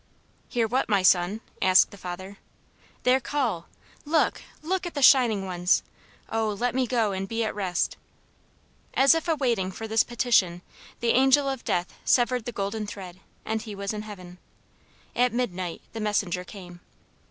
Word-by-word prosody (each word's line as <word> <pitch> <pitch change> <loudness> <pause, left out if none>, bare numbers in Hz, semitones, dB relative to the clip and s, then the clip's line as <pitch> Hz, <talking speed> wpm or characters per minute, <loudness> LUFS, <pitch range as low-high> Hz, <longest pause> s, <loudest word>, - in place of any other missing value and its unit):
"Hear 235 -2 +1
what, 255 +3 0
my 200 -3 +2
son?" 185 +4 +3 0.2
asked 185 0 +5
the - - -11
father. 185 +2 -8 0.6
"Their 255 +1 +4
call. 250 - -2 0.4
Look, 310 +2 +1 0.2
look, 370 +2 -1
at 345 - -8
the 285 - 0
shining 230 -8 +5
ones! 180 -1 +1 0.5
Oh, 225 -1 0
let 245 0 0
me 255 -1 +1
go 230 -4 +1
and 190 0 -3
be 225 +2 -1
at 220 - -2
rest!" 185 -4 -1 1.0
As 270 +3 +6
if 325 +1 -1
waiting 245 - +1
for 225 +4 -7
this 220 0 +3
petition, 230 -8 +1 0.4
the 235 - +1
Angel 270 +2 +4
of 270 -3 -3
Death 175 0 -1
severed 245 -1 +2
the 240 - -3
golden 210 0 -3
thread, 185 -3 -9 0.3
and 220 0 -2
he 210 -2 -7
was 200 +1 -3
in 210 - -4
heaven. 185 -4 -10 0.8
At 245 -1 +2
midnight 185 -8 -3
the 225 - -5
messenger 205 -4 -1
came. 180 -2 -11
215 Hz, 165 wpm, -26 LUFS, 185-250 Hz, 1.0 s, As